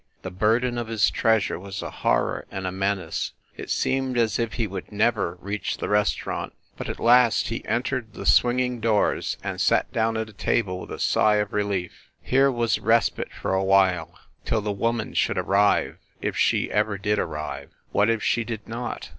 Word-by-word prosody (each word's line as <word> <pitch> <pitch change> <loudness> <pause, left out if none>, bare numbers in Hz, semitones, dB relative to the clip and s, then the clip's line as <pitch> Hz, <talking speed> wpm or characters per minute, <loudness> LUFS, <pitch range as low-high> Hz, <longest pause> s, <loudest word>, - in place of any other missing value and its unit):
The 95 - -5
burden 115 +6 +1
of 120 - -4
his 110 -3 +2
treasure 110 -6 +1
was 100 +1 -6
a - - -5
horror - - 0
and 95 -1 -5
a 95 - -1
menace; 95 -2 -2 0.2
it - - -8
seemed 130 -1 0
as 115 -2 +1
if 115 -1 -1
he 115 - -1
would 95 -1 -7
never 105 -5 +1
reach 100 +3 -3
the - - -3
restaurant. 105 -1 0 0.2
But, - - -6
at - - -5
last, 120 -1 +4
he 115 - -4
entered 120 -2 -2
the - - -7
swinging 125 0 +3
doors 110 -2 +1
and - - -3
sat - - +2
down 115 0 +1
at 110 0 -2
a 110 - -14
table 95 -2 0
with - - -9
a - - -5
sigh 105 -1 +3
of 105 -1 -1
relief. 100 -4 -3
Here 135 +2 +3
was 120 -2 0
respite 115 +1 +1
for - - -3
a 95 0 +1
while 95 -3 +2 0.3
till 110 - 0
the 105 0 -2
woman 115 +2 -1
should - - +1
arrive 100 +1 +2 0.2
if - - -3
she - - +1
ever 105 -1 +1
did 105 +1 0
arrive. 75 -2 -4 0.2
What 105 +2 +3
if 115 -2 0
she 120 - +1
did 110 -2 -6
not 120 +2 -5
110 Hz, 190 wpm, -24 LUFS, 100-115 Hz, 0.3 s, last